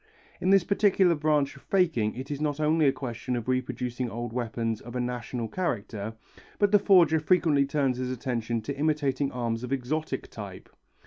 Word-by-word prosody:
In 185 - 0
this 195 -2 +6
particular 195 -2 +3
branch 150 -3 +1
of 140 - -14
faking 160 - +1
it 130 +3 -6
is 145 0 -3
not 150 -1 -1
only 155 0 +3
a - - +5
question 125 -1 -4
of 120 -1 -4
reproducing 125 -1 -2
old 120 +1 -5
weapons 115 -2 -2
of 120 +1 -10
a - - -1
national 125 -1 -3
character, 110 - -3 0.4
but 205 -1 +3
the 205 - +6
forger 175 -6 +5
frequently 155 -4 +3
turns 135 -3 0
his 130 0 -2
attention 120 -2 -2
to 140 +4 -4
imitating 145 -2 0
arms 115 -1 -2
of 125 - -5
exotic 135 +4 -2
type. - - -9
135 Hz, 180 wpm, -27 LUFS, 120-155 Hz, 0.4 s, this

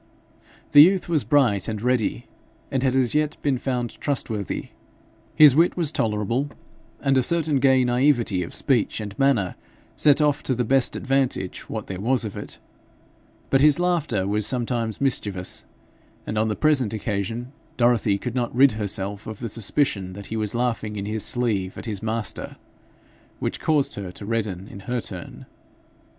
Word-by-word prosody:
The 145 - +9
youth 185 +4 +5
was 160 -5 +1
bright 115 -6 +2
and 110 -2 -3
ready, 115 - 0 0.5
and 130 - 0
had 130 -1 +1
as 130 -3 +2
yet 150 0 0
been 135 -4 +1
found 125 -3 -3
trustworthy; 110 - -2 0.7
his 150 -4 +8
wit 170 +4 +3
was 165 -4 +2
tolerable, 115 +4 -1 0.5
and 135 -1 +3
a - - +3
certain 155 0 +1
gay 130 -1 +4
naivete 120 -5 +2
of 85 - -5
speech 125 -6 +1
and 105 -2 -6
manner 130 -10 +2 0.4
set 145 -1 +4
off 150 -2 +2
to 130 - -1
the 125 - 0
best 130 +2 +2
advantage 130 -8 -1
what - - -4
there 95 -1 -6
was 120 +2 +1
of 105 - -6
it; - - -7 0.9
but 135 - +4
his 150 -1 +6
laughter 160 - 0
was 105 +1 +1
sometimes 120 -2 -2
mischievous, 100 -9 -1 0.6
and 105 - -4
on 110 +1 +1
the 105 - -1
present 140 -8 +2
occasion 110 +4 -3 0.3
Dorothy 120 -4 +3
could 120 +4 -5
not 120 -2 -2
rid 135 +1 +6
herself 100 -1 -3
of 110 -2 -6
the 115 +1 -5
suspicion 100 -3 -1
that 100 +1 -9
he - - -2
was 110 0 -2
laughing 115 -3 -1
in 100 -1 -4
his 110 0 -2
sleeve 105 -7 -1
at - - -7
his 105 -4 -4
master, 110 -1 -3 0.8
which - - -3
caused 145 -3 +1
her 100 -3 -6
to 100 - -9
redden 105 -4 -2
in 100 - -10
her 120 +6 -3
turn. 95 -5 -8
120 Hz, 170 wpm, -23 LUFS, 105-135 Hz, 0.9 s, The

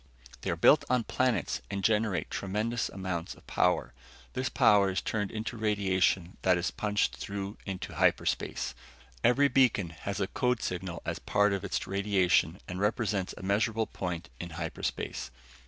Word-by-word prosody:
They - - -3
are - - +1
built - - +6
on 125 -1 +2
planets 105 - 0
and 100 -1 -3
generate 105 -2 +1
tremendous 110 +5 -1
amounts 95 -3 -4
of - - -20
power. - - +1 0.4
This - - -1
power 100 -2 +5
is 95 - 0
turned 105 -3 -2
into 110 +2 -4
radiation 95 -4 +1
that 90 -1 +4
is 85 0 -1
punched 105 -1 0
through 100 +1 -5
into 95 -2 -5
hyperspace. - - +1 0.5
Every 140 +4 +5
beacon 125 -11 +3
has 95 +5 -5
a 100 - +2
code 125 +2 0
signal 90 -2 -4
as - - -3
part 105 0 +2
of 100 0 -2
its 100 - -2
radiation 95 -4 +2
and 90 0 -5
represents 105 -2 0
a - - -9
measurable 110 +3 +1
point 85 -4 -5
in 90 - -5
hyperspace. 80 -6 -3
100 Hz, 155 wpm, -30 LUFS, 90-110 Hz, 0.5 s, built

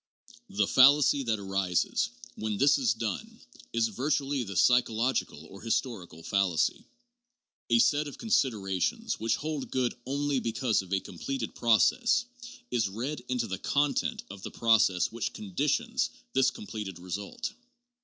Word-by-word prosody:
The 200 - +1
fallacy 140 +2 +6
that 115 -2 +1
arises 95 -3 0 0.3
when 110 -1 -3
this 140 +4 +4
is 255 -4 +2
done 110 -4 -4 0.3
is 115 -1 +1
virtually 135 +4 -1
the 100 -4 -6
psychological 115 - +2
or 95 +5 -12
historical 110 - -3
fallacy. 95 -5 0 0.8
A 120 - +5
set 145 +5 +3
of 145 - -8
considerations 135 - 0
which 110 0 +1
hold 155 -2 -4
good 125 -2 0
only 140 0 0
because 115 -2 0
of 95 -1 -13
a 95 - +2
completed 115 +7 -5
process, 235 - +3 0.5
is 115 -5 +1
read 120 +7 -4
into 125 -2 0
the 95 -3 -4
content 145 +4 0
of 100 -1 -10
the - - -6
process 110 -6 +3
which 115 -1 -3
conditions 95 -4 -1 0.2
this 135 -1 +4
completed 105 -5 -7
result. 95 - -5
115 Hz, 135 wpm, -29 LUFS, 100-135 Hz, 0.8 s, fallacy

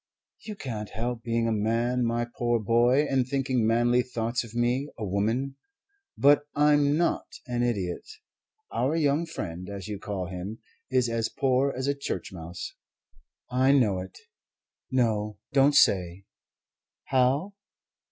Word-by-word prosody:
"You 215 - -7
can't 110 - -5
help 115 +2 -3
being 115 -1 0
a - - +1
man, 115 +3 +1
my 120 0 0
poor 120 0 -1
boy, 120 +6 +3
and 130 -3 +1
thinking 130 -4 0
manly 120 +2 +3
thoughts 115 -1 -2
of 115 -1 -12
me, 125 +4 +1
a 110 - -3
woman. 115 +8 -1 0.6
But 145 +1 +5
I'm 145 0 +4
not 170 0 0 0.2
an 120 -1 -2
idiot. 100 -8 -2 0.6
Our 140 +5 0
young 155 +1 +1
friend, 90 - -6
as 100 -3 -6
you 105 -2 -5
call 100 -3 -4
him, 95 +4 -6 0.3
is 130 -2 +2
as 115 -1 -1
poor 135 +1 +1
as 130 - -2
a 140 - +2
church 140 -8 -5
mouse. 85 0 -7 0.8
I 130 +2 +4
know 110 -9 +3
it. 90 0 -8 0.7
No, 110 -5 0 0.2
don't 140 +1 +5
say, 90 -3 +3 0.8
'How?' 135 +9 +1
120 Hz, 140 wpm, -27 LUFS, 105-135 Hz, 0.8 s, But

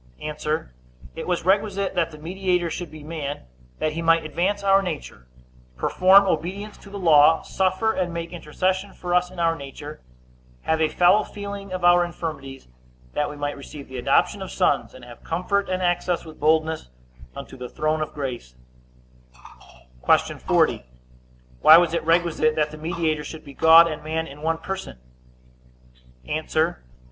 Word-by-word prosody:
A. 150 - -5 0.8
It - - -6
was 180 -2 -1
requisite 200 0 +1
that 170 -3 0
the 155 - -12
mediator 180 +1 -1
should 175 -2 -5
be 155 0 -12
man, 150 -2 -5 0.4
that 155 - -1
he 165 - -4
might 165 -1 +3
advance 190 +6 -1
our 195 0 +4
nature, 155 - -6 0.5
perform 190 - +5
obedience 195 +4 -3
to 200 - -14
the 200 - -7
law, 160 -3 +5
suffer 190 +4 0
and 180 -2 -2
make 170 +1 -5
intercession 185 +4 -2
for 175 -1 -4
us 180 0 +2
in 185 - -14
our 165 -1 +2
nature, 145 +1 -9 0.6
have 160 0 0
a 160 - +4
fellow 180 +6 +4
feeling 200 -1 -8
of 185 -1 -4
our 175 0 +6
infirmities; 145 -6 -6 0.5
that 150 - -1
we 150 - -8
might 145 0 -3
receive 140 0 -11
the 130 - -7
adoption - - +2
of - - -6
sons, - - 0
and 130 -1 -12
have 120 -1 -14
comfort 200 +4 -1
and 185 0 -1
access 175 0 0
with 155 -1 -12
boldness 160 - +1 0.5
unto - - -9
the 125 -1 -8
throne 155 0 -1
of 155 - -3
grace. 125 - -5 1.6
Q. - - -4
40. - - +1 0.8
Why 160 - +9
was 170 -1 +2
it 170 - -1
requisite 165 -2 +2
that 150 -1 0
the 155 - -9
mediator 160 -1 -2
should 160 - -9
be 140 - -11
God 165 +3 +7
and 155 -2 -5
man 160 +1 -2
in 145 0 -12
one 165 +1 0
person? 190 - -6
165 Hz, 165 wpm, -23 LUFS, 155-185 Hz, 1.6 s, Why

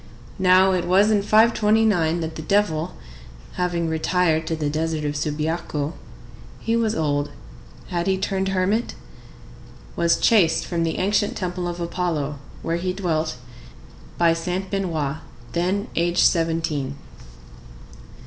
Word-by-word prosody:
Now 185 +1 +5
it 180 -2 0
was 195 +4 +4
in 210 -2 +3
529 215 -5 +3
that 160 0 -4
the 155 - -5
devil, 180 -2 0 0.6
having 175 -2 -1
retired 160 0 +1
to 160 - -1
the 155 -2 -2
desert 155 +1 -2
of 145 0 -2
Subiaco—he 155 +7 -4
was 225 -2 +1
old—had 145 - -4
he 190 0 +2
turned 190 0 -1
hermit?—was 190 -3 -3
chased 170 -8 +3
from 170 -2 -2
the 165 -1 -1
ancient 205 +2 +1
temple 180 -1 -3
of 175 0 -5
Apollo, 170 -5 -2 0.2
where 165 +1 -1
he 180 +1 -2
dwelt, 165 -6 -1 0.8
by 170 -1 +4
Saint 180 +3 -3
Benoît, 160 -7 -2 0.3
then 185 +5 -1
aged 170 +1 +2
seventeen. 160 -5 0
170 Hz, 120 wpm, -23 LUFS, 160-190 Hz, 0.8 s, Now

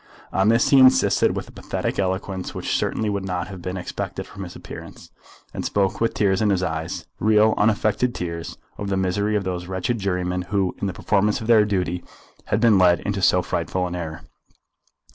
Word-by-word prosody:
On 95 +2 +3
this 115 +1 +3
he 135 - +6
insisted 130 0 +5
with - - -4
a - - -13
pathetic - - -3
eloquence 95 0 -2
which - - -2
certainly 110 - -1
would 100 -2 -1
not 90 -1 -3
have 95 -3 -8
been 90 +2 -4
expected 90 - -5
from 100 - -11
his 90 - -9
appearance, - - -10 0.4
and - - -4
spoke 100 +1 0
with 115 - +1
tears 95 -1 +2
in 105 - +3
his 95 -2 +1
eyes, 80 +2 -3
real 110 +1 +4
unaffected 110 +3 +1
tears, 85 -1 -5 0.2
of 100 - -3
the 95 - 0
misery 100 +3 0
of 105 - 0
those 90 -1 -4
wretched 95 +5 -2
jurymen 90 -2 -1
who, 95 -3 0
in 100 - 0
the - - -1
performance 105 +2 +1
of 110 - -6
their 110 -2 +5
duty, 90 -4 -1 0.4
had - - 0
been 110 -4 +5
led 90 -2 +4
into 100 -1 -2
so 90 -1 +4
frightful 85 +2 -2
an 90 - -4
error. 80 -2 -5
95 Hz, 200 wpm, -23 LUFS, 90-105 Hz, 0.4 s, he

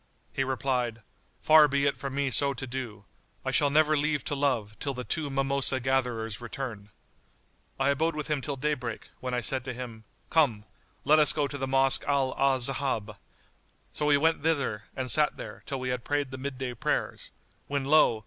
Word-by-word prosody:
He 135 - 0
replied, 125 -3 -2 0.4
"Far 155 -1 +7
be 140 0 +1
it 140 - +2
from 135 -1 -6
me 140 -1 0
so 140 +1 +3
to 125 - -5
do. 120 -6 -6 0.4
I - - 0
shall 145 - +4
never 155 +1 +3
leave 145 -1 0
to - - -2
love 125 -7 -1
till 140 -2 -3
the 125 - -5
two 150 +2 -1
mimosa 135 -1 +2
gatherers 120 -4 -1
return."[FN#84] 120 -4 -6 0.9
I 135 +1 +2
abode 160 +3 0
with 150 -1 -3
him 150 -3 -1
till 140 +1 -3
daybreak, 130 -5 -3
when 125 -1 -3
I 125 - -1
said 130 +1 0
to 130 - -3
him, 115 -3 -8 0.3
"Come 125 -10 +2 0.4
let 155 +1 +5
us 150 - +5
go 145 -2 0
to 140 - -7
the 135 -1 -3
Mosque 135 0 +5
Al 135 -2 +1
Ahzab." 130 -5 0 0.8
So 150 - -1
we 145 -1 +5
went 160 +2 +2
thither 140 -9 -1
and 130 -2 -1
sat 150 -1 +3
there, - - -8
till 135 -2 -3
we 130 0 -3
had 125 -1 -2
prayed 145 -2 -1
the 130 - -7
midday 130 -2 -4
prayers, 115 - -2 0.4
when 140 -1 -2
lo! 140 -6 +4
135 Hz, 190 wpm, -28 LUFS, 125-145 Hz, 0.9 s, Far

